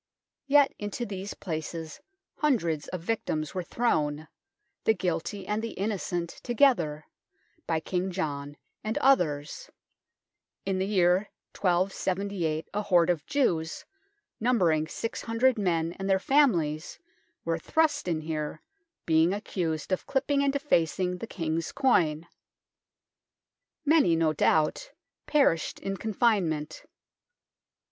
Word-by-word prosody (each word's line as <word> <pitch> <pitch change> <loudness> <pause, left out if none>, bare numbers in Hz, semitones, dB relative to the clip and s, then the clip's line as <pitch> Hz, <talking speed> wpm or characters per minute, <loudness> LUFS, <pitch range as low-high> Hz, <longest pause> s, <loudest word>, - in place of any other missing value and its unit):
Yet 285 0 +5
into 205 +4 -4
these 195 -1 -6
places 160 -2 -5 0.4
hundreds 170 - +1
of 185 - -5
victims 160 -6 -2
were 185 - -2
thrown, 155 -7 0 0.6
the 220 - +3
guilty 185 +2 -2
and 210 +3 -1
the 230 - -4
innocent 185 -4 -2
together, 200 - +2 0.6
by 160 -1 0
King 185 +2 -2
John 145 -5 -4 0.3
and 215 +1 -2
others; 175 - +1 1.0
in 190 -1 0
the 190 - 0
year 185 0 +3 0.3
1278 185 -2 0
a 210 - 0
horde 180 -4 +4
of 165 -4 -4
Jews, 175 - 0 0.5
numbering 180 -10 +2
six 225 +7 -4
hundred 230 +1 +2
men 170 -4 0
and 195 0 -3
their 190 - +5
families, 185 - +2 0.5
were 165 0 0
thrust 315 - +1
in 165 -3 0
here, 155 -1 -4 0.4
being 160 +2 +4
accused 170 -6 -3
of 185 - -1
clipping 280 +1 +1
and 280 - +3
defacing 180 - 0
the 230 - -6
King's 165 -4 -2
coin. 170 - +2 1.6
Many, 295 - +4
no 160 -1 +2
doubt, 155 - +1 0.3
perished 275 - +2
in 195 0 -3
confinement. 195 -8 0
180 Hz, 115 wpm, -28 LUFS, 160-220 Hz, 1.6 s, Yet